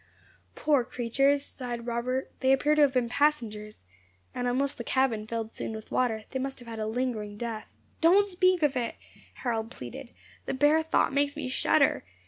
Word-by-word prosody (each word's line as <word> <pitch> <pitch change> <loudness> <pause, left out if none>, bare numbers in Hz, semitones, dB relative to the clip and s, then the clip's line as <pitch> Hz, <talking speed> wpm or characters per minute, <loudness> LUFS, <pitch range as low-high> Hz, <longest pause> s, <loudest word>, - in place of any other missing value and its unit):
"Poor 290 -4 +2
creatures!" 275 +4 +1
sighed 240 -3 -6
Robert, 245 +2 -2
"they 260 0 +3
appear 290 +3 +3
to 300 - +3
have 285 -2 +5
been 250 -2 +1
passengers; 230 - -1 0.5
and 245 0 -2
unless 270 +3 0
the 235 - -7
cabin 235 -5 0
filled 225 -1 -3
soon 225 - -5
with 220 - -10
water, 225 -4 0
they 265 - -2
must 270 +1 -3
have 245 - -13
had 225 -1 -6
a 215 - -2
lingering 220 -3 -2
death." 230 -1 -5 0.3
"Don't 370 +5 +6
speak 370 -3 +2
of 290 -2 +2
it," 240 -2 -2 0.5
Harold 225 -3 -1
pleaded. 130 - -9 0.4
"The - - -1
bare 295 +4 +4
thought 320 -3 +1
makes 285 +1 +1
me 295 -3 -4
shudder. 255 - +2
255 Hz, 180 wpm, -28 LUFS, 230-285 Hz, 0.5 s, Don't